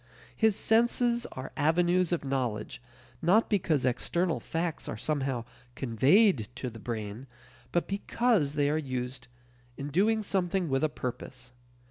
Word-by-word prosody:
His 220 -2 +3
senses 235 +2 +2
are 130 +1 -7
avenues 175 +4 +2
of 170 -4 -1
knowledge 125 -5 -2 0.4
not 205 +9 +3
because 165 -8 +1
external 165 +7 0
facts 165 0 -3
are - - -4
somehow 135 -6 -1 0.3
"conveyed" 135 - +3
to 125 - -4
the 115 - -10
brain, 110 +2 -5 0.4
but 175 - 0
because 200 - +1
they 145 -1 +2
are 155 - +1
used 130 -2 -4 0.5
in 140 +1 -5
doing 215 +8 +2
something 185 -3 0
with 135 +2 +1
a 155 - +3
purpose. 125 -1 -6
155 Hz, 135 wpm, -29 LUFS, 130-190 Hz, 0.5 s, His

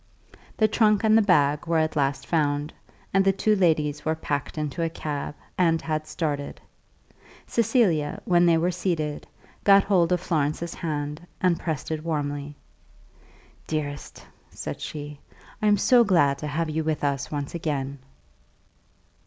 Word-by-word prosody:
The 215 - +4
trunk 215 -1 +3
and 220 0 +5
the 225 - +6
bag 150 -6 +2
were 165 0 +2
at 155 0 0
last 140 -1 0
found; 150 -2 0 0.4
and 195 0 +4
the 195 - +4
two 210 +2 +1
ladies 155 -6 +1
were 160 0 0
packed 145 -2 -3
into 150 +2 -3
a 165 - +1
cab, 150 -3 -5 0.2
and 165 -2 +3
had 155 -1 -3
started. 145 -4 -3 0.9
Cecilia, 215 - +1
when 175 -1 +4
they 165 -1 +5
were 175 +3 +1
seated, 170 -4 -2 0.4
got 200 -1 +6
hold 180 -4 +2
of 180 - +2
Florence's 160 -1 -1
hand, 150 0 -4
and 180 -2 +2
pressed 155 -4 -4
it 155 -1 -3
warmly. 145 -2 -3 1.1
"Dearest," 145 -2 -5 0.2
she - - -22
said, - - -5 0.8
"I 215 - +2
am 205 0 +5
so 240 +4 +5
glad 145 -9 +3
to 150 - -4
have 155 +2 -2
you 160 +1 -1
with 155 -1 -2
us 140 -2 -1
once 145 -2 -4
again." 140 -5 -3
160 Hz, 155 wpm, -25 LUFS, 145-180 Hz, 1.1 s, the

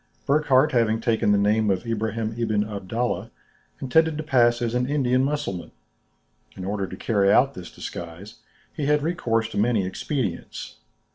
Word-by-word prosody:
Burckhardt, 145 0 +3
having 115 -3 +2
taken 115 -3 +1
the 100 - +4
name 105 +1 +2
of 95 +3 0
Ibrahim 110 0 -2
Ibn 110 -3 0
Abdallah, 110 +4 -3 0.5
intended 160 +4 +2
to 155 - -3
pass 120 -5 +3
as 120 -1 -1
an 125 0 0
Indian 130 -3 +2
Mussulman. 140 -11 -3 0.8
In 95 - -6
order 100 0 -2
to 95 - -8
carry 100 -3 +2
out 135 +5 +4
this 90 -8 -9
disguise, 85 +5 -8 0.3
he 145 - -3
had 150 0 +2
recourse 115 -9 0
to - - -3
many 110 -3 +2
expedients. 130 +8 -4
115 Hz, 155 wpm, -24 LUFS, 105-135 Hz, 0.8 s, the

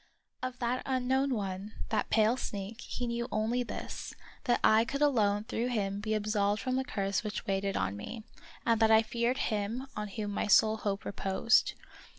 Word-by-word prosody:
Of 255 -1 -4
that 245 +1 -1
unknown 265 +1 +1
one, 195 0 -4 0.2
that - - 0
pale 220 +2 +4
sneak, 210 -1 -5
he 245 - -4
knew 235 0 -2
only 220 +4 +1
this: 240 - -6 0.3
that 240 -3 +3
I 220 +1 +6
could 280 +5 -1
alone 210 -7 +3
through 230 +2 -2
him 200 -5 -1
be 215 +1 -1
absolved 210 -1 +1
from 255 -1 -1
the 265 - +1
curse 195 -4 -1
which 210 +1 -4
weighed 195 -1 0
on 95 +1 -1
me, 215 - -7 0.4
and 230 -2 +3
that 220 - +6
I 220 0 +6
feared 235 +3 0
him 220 +4 -1
on 210 0 -3
whom 205 0 -4
my 200 - -1
sole 215 +2 +5
hope 200 -2 -2
reposed. 195 +3 +2
220 Hz, 180 wpm, -31 LUFS, 205-245 Hz, 0.4 s, I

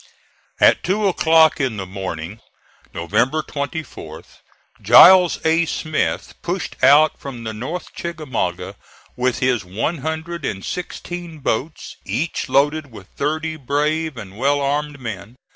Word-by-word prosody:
At - - +5
two 200 +2 +1
o'clock 160 -4 +4
in 125 -5 -1
the 95 - -4
morning, 95 0 -6 0.5
November 115 - 0
24th, 140 - -7 0.4
Giles 180 -1 +8
A. 165 +1 +3
Smith 155 0 -2
pushed 175 +1 -4
out 150 +2 +6
from 125 -4 -8
the 110 -1 -4
North 130 +11 -6
Chickamauga 150 - -4 0.4
with 125 0 0
his 125 -4 +1
one 110 - -3
hundred 160 +3 -4
and 95 -1 -4
sixteen 175 -2 -6
boats, 145 +2 -3
each 130 - -3
loaded 145 +2 +1
with 95 -4 -13
thirty 155 +2 -2
brave 150 +2 -1
and 100 -1 -9
well 145 +2 +2
armed 145 +1 -2
men. 115 -2 -7
145 Hz, 125 wpm, -20 LUFS, 115-160 Hz, 0.5 s, Giles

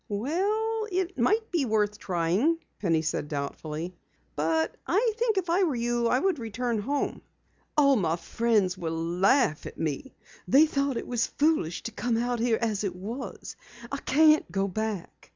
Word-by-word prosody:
"Well, 415 - -1
it 370 0 -1
might 435 - +2
be 335 -5 +1
worth 210 -2 0
trying," 185 - +1 0.2
Penny 165 -5 +1
said 155 -2 -2
doubtfully. 150 +4 -4 0.4
"But 160 +1 0
I 440 +5 +2
think 460 -3 +1
if 370 -2 0
I 345 +3 +2
were 325 -8 +2
you 240 0 0
I 250 - +3
would 360 +1 +1
return 230 0 -2
home." 280 +7 -2 0.6
"All 280 -2 +6
of 255 - +3
my 165 -3 +1
friends 205 +1 +1
will 165 -2 -3
laugh 175 - +2
at - - -10
me. 160 - -3 0.3
They 285 +4 +6
thought 280 -4 -1
it - - -4
was 240 -2 0
foolish 290 - 0
to 230 - -4
come 235 0 -1
out 240 0 -1
here 230 -1 +2
as 215 -3 -1
it 190 -3 -2
was. 220 +9 -7 0.4
I 280 - -2
can't 305 - +4
go 195 +2 0
back. 210 -1 -5
235 Hz, 170 wpm, -27 LUFS, 180-305 Hz, 0.6 s, All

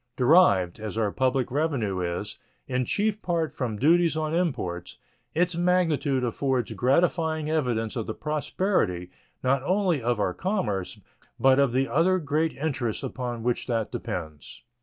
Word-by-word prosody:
Derived, 120 - +4
as 110 -1 -5
our 105 -3 +1
public 130 0 0
revenue 130 -10 0
is, 90 +3 -4 0.3
in 125 -1 0
chief 210 - 0
part 165 -3 -1
from 120 -5 -3
duties 165 +5 +3
on 155 0 -1
imports, 90 - -2 0.4
its 175 +1 +1
magnitude 165 -7 +1
affords 125 0 -1
gratifying 160 +3 +1
evidence 120 -8 0
of 115 -3 -3
the 110 - -4
prosperity, 150 - -1 0.3
not 130 +1 +2
only 180 -1 +1
of 120 -1 0
our 90 -3 0
commerce, 105 - -2 0.4
but 135 0 +5
of 140 -3 +3
the 130 +2 +1
other 180 +5 +3
great 155 0 0
interests 135 -6 -2
upon 125 -3 -4
which 120 0 -1
that 115 -3 -1
depends. 80 -4 -6
135 Hz, 145 wpm, -26 LUFS, 115-160 Hz, 0.4 s, but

